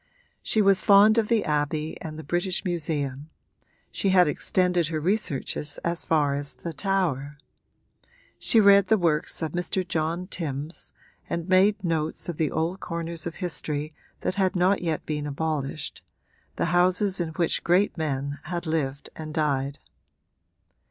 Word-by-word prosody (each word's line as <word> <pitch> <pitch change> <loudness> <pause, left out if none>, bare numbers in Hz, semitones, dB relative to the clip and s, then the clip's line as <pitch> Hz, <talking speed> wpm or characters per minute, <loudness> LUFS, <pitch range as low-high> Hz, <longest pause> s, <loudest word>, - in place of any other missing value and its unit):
She 215 - +2
was 195 -1 +4
fond 210 +2 +6
of 220 - 0
the 225 -2 +2
Abbey 150 +1 -1
and 155 -1 -6
the 160 - -7
British 175 +6 -1
Museum 150 -5 -2 0.6
she 195 - 0
had 185 -2 +5
extended 180 +3 +1
her 155 -1 -2
researches 155 -5 -2
as 170 0 -1
far 150 -3 +2
as 140 0 -4
the 170 - -6
Tower. 150 -5 -1 1.0
She 225 - +4
read 200 -2 +6
the 220 - +4
works 165 -2 0
of 155 - -2
Mr. 180 +2 -2
John 165 +2 -1
Timbs 155 -3 -5 0.4
and 170 0 -3
made 195 +2 +4
notes 160 -2 -2
of 170 -3 -4
the 155 -3 +1
old 165 +4 -2
corners 170 -1 -3
of 165 - -6
history 155 -4 -3 0.3
that - - -1
had 190 -1 +1
not 185 +2 +3
yet 165 -3 -2
been 150 -1 -3
abolished 150 -1 -3 0.5
the - - 0
houses 185 +2 +3
in 170 - -2
which 170 0 0
great 185 +4 +3
men 145 -3 -3
had 175 +1 -4
lived 145 -3 -2
and 155 -1 -7
died. 140 -2 0
165 Hz, 150 wpm, -26 LUFS, 150-185 Hz, 1.0 s, fond